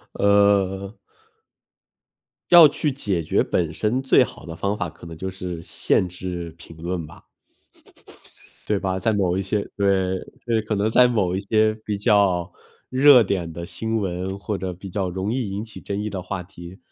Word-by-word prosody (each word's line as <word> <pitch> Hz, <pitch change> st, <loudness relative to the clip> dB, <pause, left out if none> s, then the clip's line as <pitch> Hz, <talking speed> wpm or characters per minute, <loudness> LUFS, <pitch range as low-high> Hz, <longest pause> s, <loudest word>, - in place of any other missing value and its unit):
呃 100 Hz, 0 st, +2 dB, 1.5 s
要 170 Hz, -3 st, +10 dB
去 150 Hz, +1 st, -1 dB
解 100 Hz, -10 st, -2 dB
决 -, -, +1 dB
本 80 Hz, -2 st, -1 dB
身 110 Hz, +9 st, 0 dB
最 135 Hz, -, +5 dB
好 -, -, -9 dB
的 80 Hz, -, -7 dB
方 100 Hz, +5 st, -2 dB
法， 90 Hz, -, -3 dB
可 85 Hz, -, -15 dB
能 85 Hz, -1 st, -9 dB
就 95 Hz, +3 st, -4 dB
是 90 Hz, -3 st, -6 dB
限 90 Hz, -, 0 dB
制 90 Hz, -2 st, -6 dB
评 85 Hz, -1 st, -14 dB
论 85 Hz, 0 st, -4 dB
吧。 75 Hz, -, -15 dB, 1.4 s
对 105 Hz, -, +1 dB
吧， 95 Hz, -1 st, -2 dB
在 110 Hz, +2 st, +1 dB
某 95 Hz, -3 st, +1 dB
一 -, -, 0 dB
些 100 Hz, +2 st, -2 dB
对， 95 Hz, -2 st, +1 dB, 0.3 s
对， 115 Hz, -2 st, +1 dB
可 110 Hz, 0 st, -2 dB
能 105 Hz, +2 st, +1 dB
在 125 Hz, +2 st, +6 dB
某 100 Hz, -7 st, 0 dB
一 -, -, -1 dB
些 110 Hz, +2 st, +2 dB
比 105 Hz, -1 st, -2 dB
较 100 Hz, -3 st, +2 dB, 0.4 s
热 130 Hz, -1 st, +7 dB
点 90 Hz, -5 st, -2 dB
的 85 Hz, +1 st, -6 dB
新 110 Hz, +5 st, -3 dB
闻， 95 Hz, 0 st, -3 dB
或 100 Hz, +1 st, -4 dB
者 95 Hz, -1 st, -4 dB
比 95 Hz, +2 st, -10 dB
较 95 Hz, 0 st, -2 dB
容 95 Hz, +3 st, -3 dB
易 125 Hz, -5 st, -2 dB
引 100 Hz, +2 st, -4 dB
起 110 Hz, -, -10 dB
争 100 Hz, +1 st, -4 dB
议 105 Hz, -, -3 dB
的 95 Hz, -2 st, -5 dB
话 95 Hz, 0 st, -5 dB
题， 85 Hz, 0 st, -12 dB
95 Hz, 195 characters per minute, -23 LUFS, 90-105 Hz, 1.5 s, 要